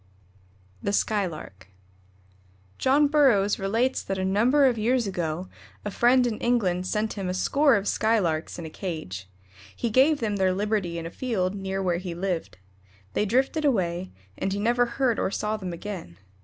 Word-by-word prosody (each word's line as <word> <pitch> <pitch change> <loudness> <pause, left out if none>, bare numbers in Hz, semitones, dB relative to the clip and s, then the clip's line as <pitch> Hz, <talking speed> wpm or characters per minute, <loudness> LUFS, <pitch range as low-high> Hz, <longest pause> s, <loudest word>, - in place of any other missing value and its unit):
THE 200 - -1
SKYLARK. 175 - -2 1.1
John 285 +3 +4
Burroughs 255 -10 +3
relates 225 +7 0
that 195 - -4
a 190 - -1
number 240 +9 +3
of 245 -4 +2
years 240 +2 +2
ago 175 -2 -3 0.4
a 205 - -2
friend 245 +4 +4
in 230 -3 -2
England 185 -7 +1
sent 215 +2 -1
him 195 -3 -4
a 180 - -2
score 280 +7 +3
of 200 -1 -1
Skylarks 185 -8 0
in 170 - -6
a 160 - -8
cage. 125 - -6 0.5
He 235 - -2
gave 280 +6 +4
them 210 -3 -1
their 190 -1 +2
liberty 200 -4 -1
in 165 - -5
a 165 - -6
field 200 -7 -1
near 195 -1 -3
where 175 -2 0
he 180 -2 -5
lived. 175 - -3 0.6
They 210 - +1
drifted 265 +8 +1
away, 185 - 0 0.3
and 195 - -1
he 200 - -2
never 240 +3 +2
heard 235 -1 0
or - - 0
saw 210 +2 -2
them 190 -4 -5
again. 170 - -7
200 Hz, 170 wpm, -26 LUFS, 180-240 Hz, 1.1 s, John